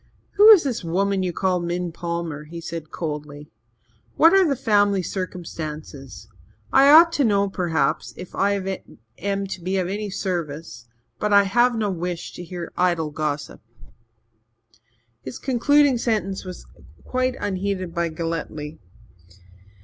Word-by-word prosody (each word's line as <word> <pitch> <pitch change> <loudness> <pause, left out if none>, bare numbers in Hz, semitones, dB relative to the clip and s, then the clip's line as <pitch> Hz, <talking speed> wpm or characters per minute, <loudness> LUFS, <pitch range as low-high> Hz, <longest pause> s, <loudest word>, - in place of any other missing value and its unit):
"Who 415 +2 +7
is 415 -6 +9
this 260 -9 -3
woman 195 +3 0
you 185 -1 -1
call 185 +1 0
Min 175 0 -3
Palmer?" 170 -3 -4
he 170 +2 -8
said 165 -2 -7
coldly. 150 -2 -6 0.6
"What 330 +3 +6
are 385 -2 +5
the 280 - +1
family 205 -5 +2
circumstances? 155 - -6 0.5
I 275 +1 +7
ought 330 +3 +8
to 295 - +1
know, 200 -4 +2
perhaps, 160 -7 -1
if 180 - -9
I 195 -1 -1 0.4
am 200 +1 -2
to 190 -2 -6
be 185 +3 -1
of 185 -2 0
any 205 +2 -3
service 160 - -4 0.3
but 210 - -1
I 200 0 +7
have 240 +5 +2
no 210 -2 0
wish 175 -1 -4
to 180 - -8
hear 175 -1 -7
idle 170 -4 +1
gossip." 150 -1 -4 1.6
His 130 - -7
concluding 275 +1 +3
sentence 210 -5 -1
was 180 -1 -9 0.4
quite 255 0 -1
unheeded 190 -2 -3
by 170 -1 -1
Galletly. 160 -2 -5
185 Hz, 140 wpm, -23 LUFS, 165-205 Hz, 1.6 s, is